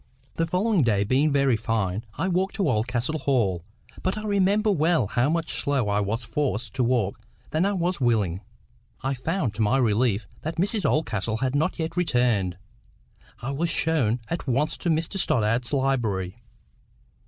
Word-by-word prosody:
The 165 - -1
following 190 +2 +2
day 105 -6 +2
being 135 +8 +2
very 140 -3 +3
fine, 110 -2 -1
I - - 0
walked 190 +1 0
to 200 - +1
Oldcastle 120 +7 0
Hall; 120 -10 +1 0.4
but 185 +3 -1
I 215 - -5
remember 205 +1 +2
well 160 - +2
how 120 +6 +1
much 165 0 0
slower 135 -7 +1
I 100 - +2
was 110 +4 -2
forced 120 -6 -2
to 130 - 0
walk 115 -5 0 0.3
than 165 +5 +2
I 205 - 0
was 180 -3 -1
willing. 105 -7 +1 0.6
I 135 +1 0
found 135 - -2
to 110 - -3
my 110 +5 +3
relief 115 -3 +2 0.2
that 160 +2 -4
Mrs 200 +5 +1
Oldcastle 110 -7 -1
had 130 +2 -1
not 150 +3 0
yet 165 0 -3
returned. 120 - +1 0.9
I 135 - -2
was 165 +5 -1
shown 125 -10 +1
at 170 +2 -4
once 140 +5 +1
to 175 - -2
Mr 165 +4 0
Stoddart's 115 -3 +1
library. 120 -8 -1
130 Hz, 165 wpm, -25 LUFS, 110-165 Hz, 0.9 s, very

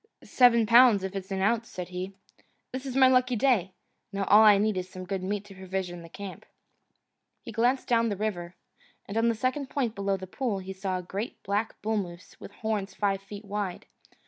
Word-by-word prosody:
"Seven 235 -3 +5
pounds 230 -3 +6
if 190 +1 -4
it's 195 -1 -5
an 190 -1 -2
ounce," 230 +2 +1
said 180 -1 -6
he. 185 +2 -5 0.6
"This 260 +1 -5
is 260 - -5
my 265 -1 +7
lucky 255 -1 +3
day. 220 -6 +2 0.4
Now 200 -1 -2
all 210 +2 +6
I 210 -2 +8
need 210 +1 +1
is 185 0 -4
some 185 0 -8
good 190 +1 -3
meat 200 +2 -3
to 205 - -12
provision 185 -2 -5
the 165 - -12
camp." 195 +2 -8 1.0
He - - -7
glanced 245 +4 +1
down 230 -1 +3
the 205 - -3
river, 185 -4 -3 0.5
and 200 - -7
on 225 +1 +3
the 230 - +1
second 260 +4 -2
point 250 -6 -1
below 200 -1 -1
the 190 - -7
pool 220 +2 -2
he 190 0 -6
saw 190 -1 -3
a 180 - -6
great 200 +6 -6
black 205 +3 -2
bullmoose 195 -5 -4
with - - -10
horns 210 -2 -3
five 195 -2 0
feet 205 +1 -10
wide. 200 -3 -4
200 Hz, 205 wpm, -28 LUFS, 190-230 Hz, 1.0 s, I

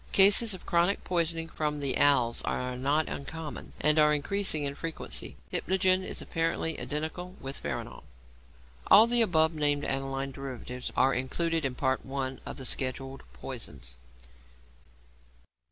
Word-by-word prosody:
Cases 205 +2 +6
of 185 - -13
chronic 175 +3 +2
poisoning 165 -2 -1
from 150 -2 -3
the 140 -2 0
'als' 130 -5 +3
are 125 0 -3
not 140 +5 +1
uncommon, 150 +2 -7
and 150 +1 +4
are 150 0 +5
increasing 160 0 0
in 140 0 -2
frequency. 165 +3 -4 0.2
Hypnogen 185 0 +2
is - - -4
apparently 165 -1 -1
identical 160 +5 -4
with 135 +1 -6
veronal. - - -5 0.9
All 215 +3 +8
the 240 0 +4
above 160 -6 +3
named 145 -2 +1
aniline 135 0 -2
derivatives 125 -2 -6
are 135 +1 +4
included 165 +5 -1
in 130 -2 -2
Part 130 0 0
I. 135 -1 -4
of - - -6
the 135 - -7
scheduled 135 +1 -3
poisons. 65 0 -7
150 Hz, 135 wpm, -29 LUFS, 135-165 Hz, 0.9 s, All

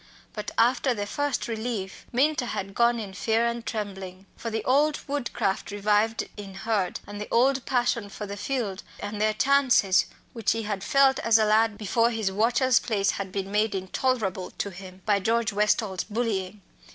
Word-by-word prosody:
But 210 - -5
after 250 +2 +3
the 205 -1 -3
first 290 +5 -2
relief 220 -4 -4
Minta 270 +1 +2
had 195 -3 -4
gone 235 +2 +3
in 200 -3 -6
fear 225 +4 +1
and 235 0 -2
trembling. 195 -4 -5
For 230 - -5
the 220 -1 -3
old 290 +3 +3
woodcraft 240 -8 -2
revived 210 +2 +1
in 195 -2 -8
Hurd, 200 -2 -1
and 205 0 -7
the 210 - -5
old 260 +2 +3
passion 240 -4 0
for 210 +1 -6
the 200 0 -6
fields 205 -3 -3 0.2
and 205 +1 -5
their 215 0 +2
chances 255 -7 +4 0.3
which 225 -3 +1
he 225 0 -3
had 205 -2 -3
felt 275 -1 +4
as 230 -1 +4
a 220 - +3
lad 215 0 +3
before 230 +2 +2
his 220 -4 -1
"watcher's" 240 +5 +3
place 200 -4 0
had 195 -1 -5
been 195 0 -4
made 210 0 +1
intolerable 190 0 -1
to 200 - -2
him 185 0 -11
by 205 -1 +3
George 225 +2 +1
Westall's 205 -2 +1
bullying. 205 -3 -3
215 Hz, 175 wpm, -26 LUFS, 200-235 Hz, 0.3 s, chances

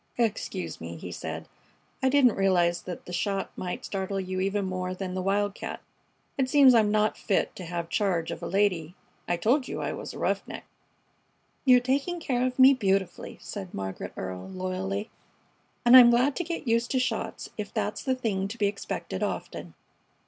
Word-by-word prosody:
"Excuse 200 - -2
me," 85 +1 -6
he 90 +2 -7
said. - - -6 0.5
"I 265 - +3
didn't 265 -3 +5
realize 175 -3 +2
the 180 0 -8
shot 195 +2 -2
might 180 -1 -5
startle 195 0 -3
you 185 0 -3
even 195 +1 0
more 185 0 -3
than 185 -1 -4
the 185 - -2
wildcat. 200 +2 -1 0.6
It 260 -1 +2
seems 275 -2 +7
I'm 220 -3 +4
not 215 0 +1
fit 195 - 0
to 185 - -7
have 170 0 -4
charge 175 -4 0
of - - -6
a - - -4
lady. 185 -4 +1 0.3
I 175 - +1
told 255 - +2
you - - -4
I - - -2
was - - -7
a - - -7
roughneck." - - -2 1.0
"You're 250 -2 +7
taking 280 +8 0
care 250 -6 0
of 255 - -5
me 265 +1 +8
beautifully," 195 -6 -1
said 195 -4 -7
Margaret 95 -1 -5
Earle, 95 - -5
loyally, 190 +3 -3 0.7
"and 240 +1 +8
I'm 245 -2 +11
glad 250 +4 +3
to 350 - 0
get 335 -4 -5
used 230 +1 +2
to 260 - +1
shots 255 - -3
if - - -5
that's - - -2
the 260 -1 +1
thing 200 -6 -1
to 220 +4 -7
be 210 - +1
expected 200 0 -3
often." - - -4
200 Hz, 180 wpm, -27 LUFS, 185-245 Hz, 1.0 s, I'm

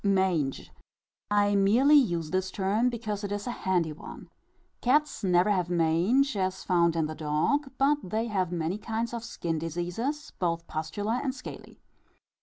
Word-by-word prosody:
Mange. 190 -8 +1 0.6
I 205 0 +3
merely 220 +9 +4
use 175 - +3
this 185 0 0
term 205 +6 +1
because 215 -3 -4
it 200 - -4
is 205 0 -3
a 245 - -2
handy 180 -8 0
one. 150 - -11 0.5
Cats 295 +2 +2
never 180 +1 +3
have 180 -3 0
mange 180 - +2
as 190 -1 -1
found 170 -2 +2
in 160 -1 +1
the 155 - -4
dog; 155 - 0
but 285 +2 +3
they 215 +5 -2
have 190 -6 -1
many 175 +3 -2
kinds 225 +2 -3
of 235 -1 -4
skin 165 -8 -3
diseases, 175 - -3
both 170 -2 -1
pustular 205 +11 -2
and 265 -2 -2
scaly. 255 - -10
195 Hz, 160 wpm, -28 LUFS, 170-235 Hz, 0.6 s, merely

